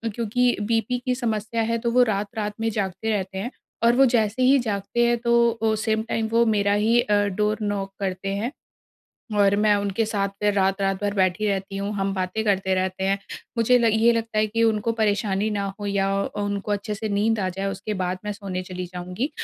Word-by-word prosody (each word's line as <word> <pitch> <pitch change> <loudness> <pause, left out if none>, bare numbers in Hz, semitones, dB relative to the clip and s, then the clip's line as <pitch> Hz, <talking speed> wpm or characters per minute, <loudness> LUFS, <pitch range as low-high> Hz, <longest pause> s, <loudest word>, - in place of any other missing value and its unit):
क्योंकि 245 +2 +1
बीपी 225 +3 0
की 250 -1 +1
समस्या 225 -2 -2
है 230 +1 0
तो - - +2
वो 250 +1 +5
रात-रात 210 0 -2
में 225 0 0
जागते 200 +1 -2
रहते 190 -2 -2
हैं 235 +7 -3 0.3
और 235 +1 +5
वो 270 +1 +6
जैसे 235 0 +1
ही 270 +2 +6
जागते 220 +1 0
हैं 240 0 +2
तो 235 0 +3
अ, 225 -1 0
सेम 220 0 0
टाइम 220 -1 0
वो 235 +1 +4
मेरा 205 -2 +2
ही 225 +3 +3
अ, 210 - -1
डोर 210 +2 0
नॉक 200 -2 -2
करते 195 0 -3
हैं। 230 +6 -2 0.9
और 200 0 +5
मैं 210 0 +4
उनके 200 +2 0
साथ 200 -2 0
फ़िर 210 0 +2
रात-रात 195 0 +1
भर 205 0 0
बैठी 190 +2 +1
रहती 195 0 -2
हूँ 200 +1 -3
हम 195 0 -1
बातें 185 +3 -2
करते 190 -2 +1
रहते 185 0 -1
हैं। 195 +1 +1 0.4
मुझे 245 +2 +4
ल 235 - +2
ये 225 +2 +4
लगता 225 -1 -2
है 215 - +3
कि 230 +2 -1
उनको 225 0 +1
परेशानी 210 -2 0
ना 205 -1 -1 0.2
हो 205 - -3
या 195 -1 +1
अ, 205 - -4
उनको 205 0 -2
अच्छे 205 +1 -2
से 215 +1 -4
नींद 210 +2 +1
आ 185 - 0
जाए 195 +2 -4
उसके 205 +2 -4
बाद 180 +1 -2
मैं 210 - -2
सोने 195 -3 -5
चली 180 0 -6
जाऊँगी। 180 - -4
210 Hz, 215 wpm, -24 LUFS, 195-225 Hz, 0.9 s, वो